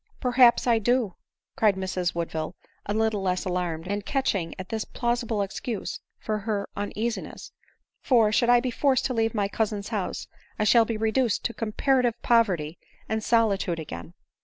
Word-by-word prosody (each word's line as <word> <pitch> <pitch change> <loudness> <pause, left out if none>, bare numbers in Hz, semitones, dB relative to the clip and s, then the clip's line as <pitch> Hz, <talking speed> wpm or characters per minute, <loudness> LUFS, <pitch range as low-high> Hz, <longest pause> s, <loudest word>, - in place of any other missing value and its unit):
" - - -36
Perhaps 250 -2 +5
I 235 -2 +4
do 240 -2 +1 0.2
;" - - -66
cried 215 -6 +3
Miss 185 -2 -2
Woodville, 165 0 -3 0.3
a 205 - 0
little 220 -2 +1
less 185 -1 -1
alarmed, 180 -2 -2
and 205 +1 -2
catching 200 - -1
at 185 -1 -7
this 220 -1 -2
plausible 235 -3 -1
excuse 205 +2 -4 0.2
for 215 -1 -3
her 205 -1 -2
un 205 0 -3
easiness; 230 +2 -4 0.5
for, 230 -5 +4
should 235 +2 +2
I 245 0 +6
be 255 0 -2
forced 265 +1 +2
to 255 - 0
leave 225 -1 0
my 205 -2 +1
cousin's 205 -1 -2
house, 210 -5 -3 0.3
I 215 - +1
shall 225 +2 +5
be 225 -1 -2
reduced 220 +1 +1
to 235 - -1
comparative 240 +2 +1
poverty 180 -10 +2 0.3
and 220 0 -2
solitude 200 -7 +2
again." 160 +2 -8
215 Hz, 175 wpm, -26 LUFS, 195-235 Hz, 0.5 s, I